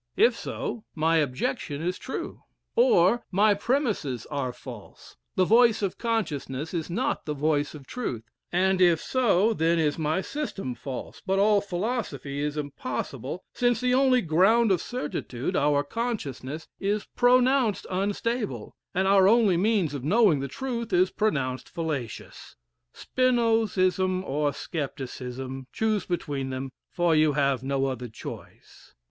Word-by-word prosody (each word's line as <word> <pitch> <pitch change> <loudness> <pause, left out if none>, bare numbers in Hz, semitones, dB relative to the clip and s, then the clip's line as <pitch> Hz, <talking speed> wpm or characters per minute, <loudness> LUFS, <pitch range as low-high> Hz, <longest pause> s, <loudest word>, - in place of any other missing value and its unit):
"'If 240 0 +5
so, 230 -1 -5
my 165 +1 +2
objection 140 +1 -1
is 180 +1 -2
true; 265 - -6 0.3
"'Or 460 - +4
my 205 +2 +4
premises 205 - -1
are 140 -3 -1
false; - - -12 0.2
the 185 - +3
voice 230 0 +4
of 195 - -2
consciousness 160 - -2
is 165 -2 -3
not 170 - -2
the 150 - -2
voice 145 0 0
of 140 -3 -11
truth; 130 - -4 0.3
"'And 185 +1 +2
if 175 -3 +5
so, 225 -3 +2
then 165 -2 +2
is 155 -1 +1
my 155 +4 0
system 195 - -4
false, 130 +2 -7
but 195 0 0
all 205 +1 +4
philosophy 180 - -3
is 150 +1 -2
impossible; 140 +1 -4
since 245 -1 +2
the 250 0 +1
only 255 -2 +4
ground 195 +8 +4
of 185 - +2
certitude 150 - -4
our 145 0 +3
consciousness 155 - -4
is 205 +1 -1
pronounced 250 -2 +3
unstable, 200 - -2 0.2
our 190 +1 +5
only 215 -3 +5
means 195 -4 +1
of 140 -3 -5
knowing 190 - +4
the 140 - -3
truth 235 - -4
is 180 +1 +3
pronounced 135 -12 -1
fallacious.'" 150 -9 -5 0.4
"Spinozism 215 -7 +1
or 145 -2 0
scepticism, 130 -3 -5
choose 220 -2 0
between 145 -6 -2
them, 130 0 -4 0.2
for 175 -2 +2
you 155 -1 +4
have 140 -3 +1
no 135 0 0
other 125 -2 -3
choice. 110 - -11
175 Hz, 140 wpm, -26 LUFS, 140-220 Hz, 0.4 s, If